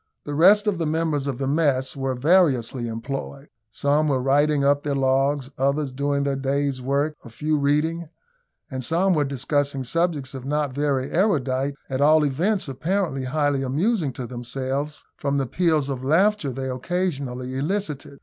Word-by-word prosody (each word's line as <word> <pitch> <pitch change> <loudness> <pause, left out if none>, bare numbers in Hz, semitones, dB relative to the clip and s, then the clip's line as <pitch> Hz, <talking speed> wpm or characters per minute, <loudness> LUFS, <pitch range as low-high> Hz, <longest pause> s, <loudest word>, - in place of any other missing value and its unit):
The 145 - -5
rest 195 +8 +6
of 205 -5 0
the 165 - 0
members 155 -3 0
of 135 -3 -2
the 135 - -2
mess 140 -2 +1
were 135 -1 -2
variously 130 -5 +2
employed. 135 +5 -6 0.2
Some 145 +7 +1
were 135 -3 +1
writing 140 +2 +2
up 140 0 +3
their 145 -1 -2
logs; 135 +1 +1
others 140 +1 +1
doing 140 +1 -1
their 140 -1 0
day's 135 0 -1
work; 140 +4 0
a - - -11
few 150 +7 -1
reading, 150 +4 0 0.6
and 130 -1 -4
some 180 +7 +2
were 150 -3 +2
discussing 140 0 -1
subjects, 155 -1 -1
if 130 -2 -7
not 145 0 -1
very 140 -1 -1
erudite, 140 - +1
at 130 0 -2
all 155 +1 +5
events, 175 +9 0
apparently 155 0 -1
highly 145 0 0
amusing 155 - 0
to 125 - -6
themselves, 130 +4 -4
from 140 0 -1
the 135 - 0
peals 160 0 +1
of 130 -2 -4
laughter 165 +2 +2
they 130 +1 -4
occasionally 130 -3 -3
elicited. 150 -2 -3
140 Hz, 165 wpm, -23 LUFS, 135-155 Hz, 0.6 s, rest